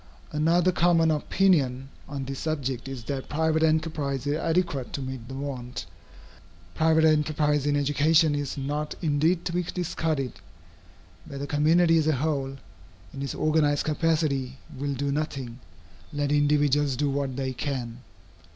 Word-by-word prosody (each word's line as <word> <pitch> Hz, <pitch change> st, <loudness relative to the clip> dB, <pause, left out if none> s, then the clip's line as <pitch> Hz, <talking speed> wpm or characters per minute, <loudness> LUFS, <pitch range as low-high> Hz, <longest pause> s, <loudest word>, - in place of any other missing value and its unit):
Another 165 Hz, +4 st, +3 dB
common 170 Hz, -2 st, +3 dB
opinion 145 Hz, -5 st, +1 dB, 0.2 s
on 140 Hz, -2 st, -4 dB
this 135 Hz, 0 st, -5 dB
subject 135 Hz, -5 st, -3 dB
is 135 Hz, -3 st, -6 dB
that 135 Hz, +1 st, -4 dB
private 160 Hz, +1 st, +1 dB
enterprise 155 Hz, -4 st, 0 dB
is 145 Hz, -, +1 dB
adequate 165 Hz, -5 st, -1 dB
to 140 Hz, -, -3 dB
meet 130 Hz, -3 st, -6 dB
the 135 Hz, -, -7 dB
want. 130 Hz, -5 st, -5 dB, 0.9 s
Private 160 Hz, -, +3 dB
enterprise 150 Hz, -2 st, +2 dB
in 145 Hz, -, +2 dB
education 145 Hz, +2 st, +3 dB
is 145 Hz, -1 st, -3 dB
not 145 Hz, +2 st, -3 dB
indeed 160 Hz, +3 st, +1 dB
to 170 Hz, -, -2 dB
be 180 Hz, -, +1 dB
discarded. 160 Hz, -6 st, -2 dB, 0.9 s
Where 140 Hz, -, -7 dB
the 140 Hz, -, -4 dB
community 165 Hz, +3 st, +4 dB
as 155 Hz, -, 0 dB
a 155 Hz, -, +4 dB
whole, 135 Hz, -1 st, -2 dB, 0.6 s
in 135 Hz, -, -6 dB
its 140 Hz, -, -3 dB
organized 155 Hz, -2 st, +2 dB
capacity, 150 Hz, -5 st, 0 dB, 0.2 s
will 140 Hz, +1 st, -3 dB
do 140 Hz, +2 st, -1 dB
nothing, 135 Hz, -5 st, -3 dB, 0.5 s
let 145 Hz, -1 st, -1 dB
individuals 145 Hz, -1 st, +2 dB
do 145 Hz, +3 st, 0 dB
what 140 Hz, -2 st, -2 dB
they 130 Hz, -1 st, -2 dB
can. 125 Hz, -4 st, -4 dB
145 Hz, 145 wpm, -26 LUFS, 135-160 Hz, 0.9 s, community